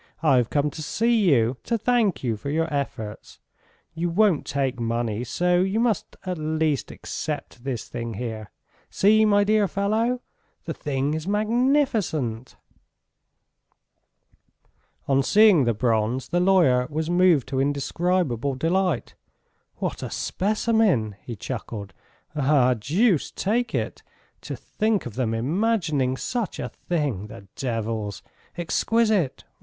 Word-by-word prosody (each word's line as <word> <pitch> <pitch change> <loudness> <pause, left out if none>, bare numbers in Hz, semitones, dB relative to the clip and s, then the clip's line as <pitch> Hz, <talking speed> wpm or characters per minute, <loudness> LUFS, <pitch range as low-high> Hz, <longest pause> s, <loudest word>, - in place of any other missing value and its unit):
"I've 130 -6 +4
come 145 0 +1
to 155 - -8
see 220 +4 +2
you... 125 -2 +3
to 235 - 0
thank 225 - +1
you 115 -3 0
for 140 +7 -6
your 160 +3 +1
efforts.... 115 -7 -4 0.6
You 170 +2 -2
won't 195 -2 +2
take 135 -3 -1
money 115 -1 -1
so 175 +8 +1
you 195 +4 0
must 235 -2 0
at 180 -3 -3
least 155 -2 0
accept 145 -5 -6
this 130 -5 -4
thing 115 -2 -5
here.... 110 -2 -5 0.4
See, 215 +2 +4
my 205 -1 +4
dear 210 0 +3
fellow.... 220 +6 0 0.4
The - - -3
thing 140 0 -2
is 160 +2 -4
magnificent!" 215 - 0 2.5
On 135 0 +3
seeing 200 - +5
the 120 - +2
bronze 115 +2 0
the 175 - +1
lawyer 170 -10 +4
was 160 +2 -2
moved 175 -7 +4
to 135 0 0
indescribable 140 -1 0
delight. 165 0 0 0.6
"What - - -4
a - - -4
specimen!" 205 - +1
he 120 - -7
chuckled. 105 -3 -6 0.4
"Ah, 135 -3 +3
deuce 160 - +1
take 235 +5 -1
it, - - -3 0.4
to - - -5
think 215 -1 -1
of 120 - -6
them 115 -1 -1
imagining 150 - 0
such 235 - -3
a - - -4
thing, 145 - -3
the 100 -2 -12
devils! 110 - -3 0.3
Exquisite! 205 - +1
150 Hz, 130 wpm, -24 LUFS, 125-200 Hz, 2.5 s, seeing